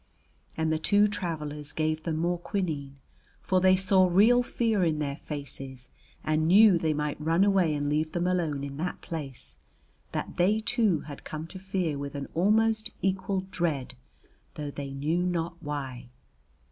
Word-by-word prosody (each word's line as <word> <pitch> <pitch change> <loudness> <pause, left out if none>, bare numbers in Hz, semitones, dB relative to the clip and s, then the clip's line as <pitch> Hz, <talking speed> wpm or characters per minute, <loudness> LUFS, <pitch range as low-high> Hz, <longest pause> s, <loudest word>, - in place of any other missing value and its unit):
And 160 0 +1
the 155 - 0
two 205 +5 +4
travelers 150 -7 -4
gave 155 0 0
them 160 -1 -2
more 175 +2 0
quinine, 155 -8 -3 0.4
for 185 -1 +1
they 185 0 +6
saw 185 0 +4
real 215 +8 +5
fear 225 -5 0
in 160 -3 +1
their 140 -2 -2
faces, 135 -4 -8 0.3
and 155 +1 +1
knew 195 0 +7
they 160 -1 +1
might 150 0 -2
run 165 +4 +3
away 190 -6 +3
and 145 0 -1
leave 155 +2 0
them 175 0 0
alone 165 -6 0
in 140 0 -6
that 180 +4 -3
place, 145 -6 -7 0.5
that - - -4
they, 200 +5 +3
too, 220 - +1
had 145 -2 -10
come 155 +1 -6
to 190 +3 -10
fear 185 -6 -2
with 140 0 -5
an 140 -1 -4
almost 220 +5 +2
equal 190 0 0
dread, 155 -9 -1 0.6
though 145 -1 -4
they 140 -1 -6
knew 145 +5 -1
not 170 -1 -2
why. 135 -5 -5
165 Hz, 165 wpm, -28 LUFS, 145-185 Hz, 0.6 s, knew